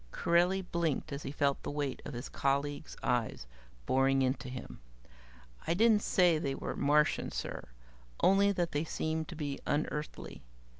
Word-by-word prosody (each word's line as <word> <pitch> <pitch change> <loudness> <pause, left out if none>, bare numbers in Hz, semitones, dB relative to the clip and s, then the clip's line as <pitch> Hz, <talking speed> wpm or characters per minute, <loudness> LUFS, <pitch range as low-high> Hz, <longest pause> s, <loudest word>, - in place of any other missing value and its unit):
Corelli 175 +3 +2
blinked 165 -4 -1
as 140 - -4
he 135 - -5
felt 140 -1 +1
the - - -5
weight 145 -2 -3
of 140 - -6
his 120 - -5
colleagues' 140 +2 -1
eyes 120 - 0 0.4
boring 135 +1 +3
into 130 0 -1
him. 125 - -8 0.9
"I 165 - +2
didn't 220 +1 +5
say 175 -6 +3
they 140 -3 -2
were - - -4
Martian, 150 +2 +2
sir - - -5 0.5
only 200 +1 +5
that 175 -3 -1
they 145 +1 0
seemed 160 0 -2
to - - -8
be 145 -3 -4
unearthly. 150 0 -3
150 Hz, 155 wpm, -32 LUFS, 135-170 Hz, 0.9 s, didn't